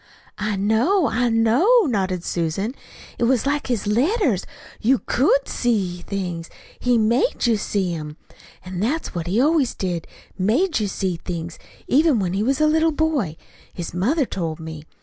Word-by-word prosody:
"I 210 Hz, -1 st, -1 dB
know, 230 Hz, -, +2 dB
I 245 Hz, +1 st, +1 dB
know," 240 Hz, -, +4 dB
nodded 190 Hz, -, -1 dB
Susan. 180 Hz, +8 st, -2 dB, 0.5 s
"It 235 Hz, -, +2 dB
was 250 Hz, 0 st, +2 dB
like 290 Hz, +1 st, 0 dB
his 240 Hz, -5 st, -1 dB
letters 250 Hz, -, +1 dB, 0.3 s
you 260 Hz, +4 st, +4 dB
could -, -, +2 dB
SEE 195 Hz, -8 st, -1 dB
things. 180 Hz, -4 st, -4 dB, 0.3 s
He 245 Hz, -1 st, +2 dB
MADE 235 Hz, -, +2 dB
you 235 Hz, -2 st, +4 dB
see 195 Hz, -3 st, -1 dB
'em. 150 Hz, -1 st, -6 dB, 0.5 s
An' 185 Hz, -1 st, -5 dB
that's 270 Hz, -, -1 dB
what 170 Hz, -1 st, -4 dB
he 195 Hz, +6 st, +1 dB
always 290 Hz, -1 st, +2 dB
did 175 Hz, -3 st, -3 dB, 0.3 s
made 260 Hz, -, +2 dB
you 210 Hz, -, 0 dB
see 190 Hz, -2 st, -2 dB
things 170 Hz, 0 st, -6 dB, 0.3 s
even 300 Hz, -1 st, +4 dB
when 185 Hz, -4 st, -1 dB
he 195 Hz, -, 0 dB
was 265 Hz, +6 st, +1 dB
a 305 Hz, -, +4 dB
little 320 Hz, +1 st, +3 dB
boy. 290 Hz, -, 0 dB, 0.4 s
His 170 Hz, -3 st, -5 dB
mother 255 Hz, -, +1 dB
told 165 Hz, -7 st, -4 dB
me. 160 Hz, -1 st, -8 dB
220 Hz, 165 wpm, -22 LUFS, 180-275 Hz, 0.5 s, know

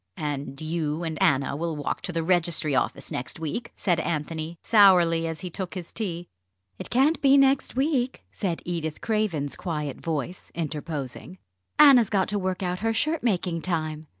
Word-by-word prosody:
"And 140 Hz, -2 st, -4 dB
you 155 Hz, 0 st, -2 dB
and 160 Hz, -2 st, -4 dB
Anna 140 Hz, 0 st, +2 dB
will 165 Hz, +1 st, -2 dB
walk 145 Hz, -2 st, -3 dB
to 180 Hz, -, -3 dB
the 165 Hz, -1 st, -1 dB
Registry 170 Hz, -3 st, +1 dB
Office 130 Hz, -, -1 dB
next 130 Hz, +5 st, -4 dB
week?" 165 Hz, +10 st, -4 dB
said 175 Hz, -4 st, +1 dB
Anthony, 160 Hz, +1 st, -3 dB
sourly, 175 Hz, -6 st, +5 dB
as 160 Hz, -1 st, -5 dB
he 180 Hz, -2 st, -5 dB
took 185 Hz, +1 st, -5 dB
his 175 Hz, -3 st, -7 dB
tea. 175 Hz, -6 st, -4 dB, 0.5 s
"It -, -, -7 dB
can't 280 Hz, +6 st, +3 dB
be 275 Hz, 0 st, +6 dB
next 275 Hz, -1 st, +3 dB
week," 265 Hz, -2 st, 0 dB
said 180 Hz, -5 st, -3 dB
Edith 165 Hz, -3 st, -3 dB
Craven's 205 Hz, -11 st, -1 dB
quiet 150 Hz, -6 st, -4 dB
voice, 165 Hz, +2 st, -4 dB
interposing. 155 Hz, 0 st, -5 dB, 0.4 s
"Anna's 270 Hz, -7 st, +7 dB
got 195 Hz, -3 st, +1 dB
to 205 Hz, -1 st, 0 dB
work 185 Hz, 0 st, -2 dB
out 180 Hz, 0 st, -2 dB
her 225 Hz, +1 st, 0 dB
shirt 310 Hz, +7 st, 0 dB
making 180 Hz, -7 st, 0 dB
time. 155 Hz, -3 st, -2 dB
170 Hz, 170 wpm, -26 LUFS, 155-205 Hz, 0.5 s, Anna's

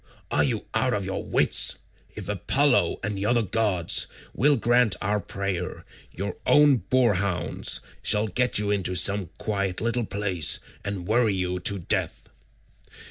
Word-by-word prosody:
Are -, -, +3 dB
you -, -, -1 dB
out -, -, +1 dB
of -, -, -3 dB
your -, -, -3 dB
wits? -, -, +2 dB, 0.4 s
If -, -, -7 dB
Apollo 130 Hz, +7 st, +1 dB
and 105 Hz, 0 st, -2 dB
the 100 Hz, +1 st, -2 dB
other 120 Hz, 0 st, +2 dB
gods 100 Hz, -4 st, +1 dB, 0.3 s
will 145 Hz, +2 st, +3 dB
grant 120 Hz, -2 st, +3 dB
our 105 Hz, +2 st, 0 dB
prayer, 95 Hz, -3 st, -4 dB, 0.3 s
your 100 Hz, +4 st, -5 dB
own 145 Hz, -2 st, +6 dB
boarhounds 100 Hz, -7 st, +1 dB, 0.2 s
shall 105 Hz, +1 st, +2 dB
get 125 Hz, +5 st, +1 dB
you 105 Hz, 0 st, 0 dB
into 95 Hz, -2 st, 0 dB
some 100 Hz, -1 st, +3 dB
quiet 100 Hz, -4 st, -2 dB
little 115 Hz, 0 st, -1 dB
place, 95 Hz, -6 st, 0 dB, 0.2 s
and 100 Hz, -3 st, -5 dB
worry 110 Hz, -2 st, +2 dB
you 90 Hz, -1 st, -2 dB
to 100 Hz, +3 st, +1 dB
death." 60 Hz, -8 st, -2 dB
100 Hz, 145 wpm, -25 LUFS, 95-115 Hz, 0.4 s, own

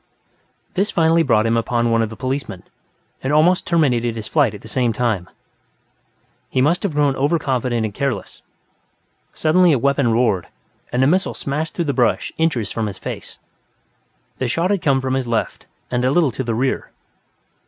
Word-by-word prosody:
This 200 Hz, +3 st, 0 dB
finally 165 Hz, -1 st, +3 dB
brought 110 Hz, -8 st, +3 dB
him 115 Hz, 0 st, +2 dB
upon 120 Hz, 0 st, 0 dB
one 115 Hz, 0 st, +3 dB
of 110 Hz, -, -1 dB
the 110 Hz, -, -8 dB
policemen, 130 Hz, -8 st, -4 dB, 0.6 s
and 130 Hz, -, -2 dB
almost 165 Hz, +5 st, +3 dB
terminated 125 Hz, -9 st, +1 dB
his 110 Hz, -1 st, -5 dB
flight 135 Hz, -8 st, +2 dB
at 100 Hz, -, -11 dB
the -, -, -11 dB
same 120 Hz, +1 st, 0 dB
time. 110 Hz, -6 st, -1 dB, 1.2 s
He -, -, -1 dB
must 155 Hz, +7 st, +2 dB
have 185 Hz, -7 st, -2 dB
grown 145 Hz, -2 st, +2 dB
over 145 Hz, +5 st, +2 dB
confident 125 Hz, -5 st, -1 dB
and 105 Hz, -, -5 dB
careless; 125 Hz, -6 st, -3 dB, 0.9 s
suddenly 170 Hz, +1 st, +3 dB
a -, -, +3 dB
weapon 140 Hz, -1 st, +2 dB
roared, 110 Hz, -6 st, +1 dB, 0.4 s
and 125 Hz, +1 st, +1 dB
a -, -, +5 dB
missile 185 Hz, +7 st, +1 dB
smashed 150 Hz, +3 st, -3 dB
through 170 Hz, -, -1 dB
the 140 Hz, -, 0 dB
brush 125 Hz, -3 st, +1 dB
inches 155 Hz, -10 st, 0 dB
from 110 Hz, -2 st, -2 dB
his 100 Hz, -2 st, -6 dB
face. -, -, -7 dB, 1.0 s
The 130 Hz, -, 0 dB
shot 165 Hz, -, 0 dB
had 200 Hz, -3 st, 0 dB
come 135 Hz, -3 st, +2 dB
from 130 Hz, 0 st, -2 dB
his 130 Hz, -2 st, -1 dB
left 115 Hz, -2 st, -2 dB, 0.2 s
and 125 Hz, 0 st, 0 dB
a 130 Hz, -, +3 dB
little 150 Hz, -1 st, +3 dB
to 130 Hz, -, -4 dB
the 115 Hz, -2 st, -2 dB
rear. 130 Hz, +3 st, -1 dB
130 Hz, 185 wpm, -20 LUFS, 115-155 Hz, 1.2 s, a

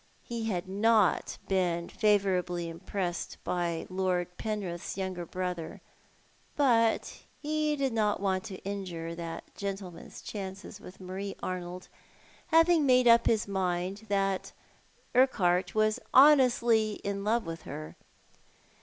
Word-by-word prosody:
He 230 Hz, -1 st, -4 dB
had 185 Hz, -5 st, -2 dB
not 210 Hz, 0 st, +2 dB
been 175 Hz, -3 st, 0 dB
favourably 185 Hz, -5 st, +1 dB
impressed 175 Hz, +1 st, -4 dB
by 170 Hz, -2 st, -2 dB
Lord 180 Hz, -1 st, -1 dB
Penrith's 195 Hz, -6 st, -4 dB
younger 185 Hz, -3 st, -4 dB
brother; 180 Hz, -2 st, -4 dB, 0.8 s
but 230 Hz, -6 st, +2 dB, 0.2 s
he 305 Hz, 0 st, 0 dB
did 270 Hz, -3 st, -1 dB
not 210 Hz, -2 st, +1 dB
want 190 Hz, -1 st, 0 dB
to 195 Hz, -4 st, -6 dB
injure 180 Hz, -5 st, -4 dB
that 170 Hz, -1 st, -7 dB
gentleman's 195 Hz, -4 st, -7 dB
chances 195 Hz, 0 st, -7 dB
with 180 Hz, -, -12 dB
Marie 190 Hz, +2 st, -5 dB
Arnold, 180 Hz, 0 st, -5 dB, 0.6 s
having 330 Hz, -1 st, +5 dB
made 255 Hz, -2 st, +4 dB
up 235 Hz, 0 st, +6 dB
his 220 Hz, -2 st, +2 dB
mind 190 Hz, +2 st, -2 dB
that 195 Hz, -1 st, 0 dB, 0.6 s
Urquhart 185 Hz, -8 st, +3 dB
was 215 Hz, 0 st, +2 dB, 0.2 s
honestly 240 Hz, -6 st, +6 dB
in 200 Hz, 0 st, -3 dB
love 225 Hz, +2 st, +1 dB
with 165 Hz, 0 st, -6 dB
her. 75 Hz, +1 st, -7 dB
195 Hz, 120 wpm, -30 LUFS, 180-225 Hz, 0.8 s, up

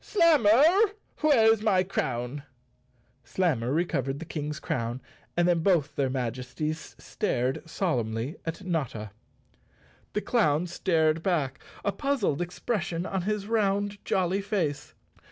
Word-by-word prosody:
Slammer, 295 Hz, -, +5 dB, 0.6 s
where's 225 Hz, -8 st, +5 dB
my 195 Hz, -4 st, +3 dB
crown? 130 Hz, -6 st, -2 dB, 0.4 s
" 125 Hz, +1 st, -39 dB
Slammer 150 Hz, -10 st, +1 dB
recovered 140 Hz, -4 st, 0 dB
the 165 Hz, -, -7 dB
King's 150 Hz, -2 st, -4 dB
crown 120 Hz, +1 st, -2 dB, 0.4 s
and 175 Hz, 0 st, +4 dB
then 175 Hz, -1 st, +3 dB
both 165 Hz, -5 st, +2 dB
their 135 Hz, -2 st, +1 dB
Majesties 130 Hz, +5 st, -4 dB
stared 125 Hz, +2 st, -1 dB
solemnly 120 Hz, -, -1 dB
at 165 Hz, +3 st, -5 dB
Notta. 135 Hz, -, -3 dB, 1.0 s
The 210 Hz, -, 0 dB
clown 175 Hz, -10 st, +2 dB
stared 160 Hz, -2 st, +1 dB
back, 155 Hz, -8 st, -1 dB, 0.2 s
a 200 Hz, -, +2 dB
puzzled 260 Hz, -, 0 dB
expression 175 Hz, -1 st, -2 dB
on 190 Hz, -1 st, -2 dB
his 205 Hz, +2 st, -2 dB
round 205 Hz, -2 st, 0 dB
jolly 190 Hz, +1 st, +1 dB
face. 190 Hz, -8 st, -2 dB
170 Hz, 120 wpm, -27 LUFS, 135-200 Hz, 1.0 s, Slammer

